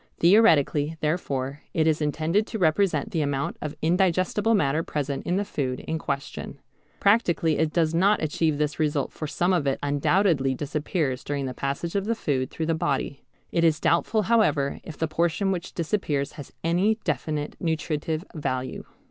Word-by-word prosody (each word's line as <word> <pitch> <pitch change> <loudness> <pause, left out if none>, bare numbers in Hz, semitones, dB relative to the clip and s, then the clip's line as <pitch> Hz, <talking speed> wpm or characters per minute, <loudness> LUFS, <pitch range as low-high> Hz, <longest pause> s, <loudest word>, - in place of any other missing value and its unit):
Theoretically, 165 -6 +4
therefore, 140 -3 -2
it 160 - +3
is 160 -1 +2
intended 160 +7 +1
to 225 - -4
represent 165 -3 +2
the 160 - 0
amount 140 -1 -1
of 150 -1 -4
indigestible 185 +5 +2
matter 150 -4 +2
present 145 -3 -3
in 175 - +1
the 200 +2 0
food 130 -8 -3
in 160 0 -3
question. 140 -3 -4 0.4
Practically 175 -7 +3
it 160 -1 +1
does 160 -1 +1
not 195 +5 +3
achieve 155 0 0
this 150 +1 -1
result 150 -2 0
for 155 - -5
some 175 +5 +1
of 160 -6 +1
it 135 - +1
undoubtedly 145 -1 +2
disappears 145 -1 -2
during 145 -1 -2
the 130 - -4
passage 140 +6 -3
of 200 -1 0
the 230 +2 0
food 130 -10 -1
through 160 - -3
the 165 - +1
body. 140 -3 -1 0.3
It 170 - +1
is 160 -2 +3
doubtful 210 +6 +2
however 200 -11 +2
if 155 - -9
the 160 - 0
portion 170 +4 0
which 175 -2 -4
disappears 150 -5 -1
has 145 - -10
any 180 +6 +2
definite 150 0 -2
nutritive 160 0 -2
value. 130 -5 -3
155 Hz, 170 wpm, -25 LUFS, 145-175 Hz, 0.4 s, Theoretically